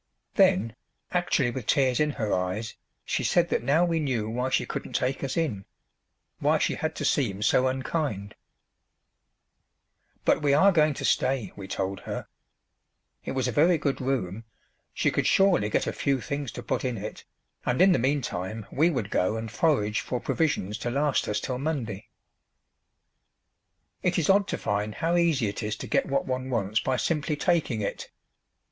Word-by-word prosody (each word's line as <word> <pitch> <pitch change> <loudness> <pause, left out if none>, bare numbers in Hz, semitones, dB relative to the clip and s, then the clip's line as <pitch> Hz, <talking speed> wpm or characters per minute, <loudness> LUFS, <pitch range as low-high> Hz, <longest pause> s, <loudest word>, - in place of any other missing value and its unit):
Then, 185 - +3 0.4
actually 170 -8 +1
with 125 -2 -6
tears 130 -3 +3
in 150 0 +3
her 110 -5 -1
eyes, 90 +5 -2 0.3
she - - -1
said 170 -1 +2
that - - +1
now 160 +5 +3
we 165 -2 0
knew 125 -8 -1
why 125 +3 -1
she 130 - +1
couldn't - - -6
take 130 +2 -1
us 135 +2 -2
in 130 -13 -1 0.8
why - - +3
she - - 0
had - - -3
to - - -3
seem 105 -7 +1
so 125 +5 +3
unkind. 130 -6 -2 1.9
But - - +3
we 140 -1 +3
are 195 +7 +6
going 155 -4 +3
to 140 - -4
stay, 130 -8 +1
we 100 -2 -8
told 95 0 -3
her. - - -6 1.0
It - - -3
was 130 -1 0
a - - 0
very 165 +8 +4
good 140 -3 -1
room; 115 -6 -2 0.5
she - - +1
could - - 0
surely 190 - +4
get - - +1
a - - -2
few 140 -2 0
things 140 +3 -4
to - - -7
put - - -2
in 125 -3 -1
it, 105 +2 -7 0.4
and 125 - 0
in 190 +2 +7
the 175 - +3
meantime 115 -6 -2
we 160 +5 +3
would 125 - -2
go 95 +4 +1
and 110 -1 -5
forage 110 -9 +1
for 125 - -3
provisions 145 - -1
to 120 - -2
last 140 +2 +1
us 105 0 0
till 125 +3 -3
Monday. 130 -9 -3 1.9
It 180 0 +1
is 170 +2 +3
odd 200 +1 +3
to - - -2
find 105 +1 -2
how 170 +1 0
easy 165 -8 +2
it 100 - -4
is 105 -1 -2
to - - -7
get - - +1
what 140 0 0
one 130 0 -3
wants 110 -3 0
by 130 -1 0
simply 150 +5 0
taking 150 - 0
it! 100 - -4
130 Hz, 180 wpm, -27 LUFS, 110-150 Hz, 1.9 s, in